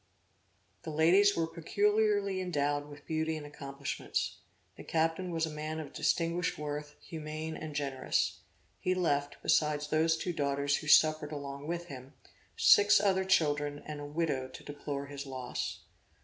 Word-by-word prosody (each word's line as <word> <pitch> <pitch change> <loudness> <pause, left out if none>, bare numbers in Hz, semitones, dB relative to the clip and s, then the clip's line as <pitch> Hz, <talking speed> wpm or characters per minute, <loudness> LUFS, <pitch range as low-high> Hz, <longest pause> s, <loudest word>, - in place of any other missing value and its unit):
The - - -7
ladies 180 +7 +5
were 165 - +2
peculiarly 205 +3 +1
endowed 145 -4 -1
with 145 0 -12
beauty 160 0 -1
and 150 - -7
accomplishments. 140 -1 -4 0.4
The - - -10
captain 165 +3 0
was 165 -1 0
a 160 - -5
man 155 +1 -4
of 155 - -7
distinguished 170 0 0
worth; 150 0 -5
humane 155 -1 -6
and 155 -2 -7
generous. 135 -3 0 0.4
(He 185 0 0
left, 145 -5 0
besides 150 -1 +2
those 160 +1 +3
two 175 +2 -3
daughters 140 -1 +1
who 155 - -7
suffered 155 0 +5
along 140 -1 -6
with 170 +1 -3
him, 135 -3 -10 0.4
six 205 0 +7
other 190 -2 +2
children 145 -5 +1
and 150 -1 -6
a 145 - -6
widow 145 -4 -1
to 130 - -11
deplore 145 -1 -5
his 140 0 -7
loss.) 130 -2 -4
155 Hz, 150 wpm, -32 LUFS, 145-165 Hz, 0.4 s, six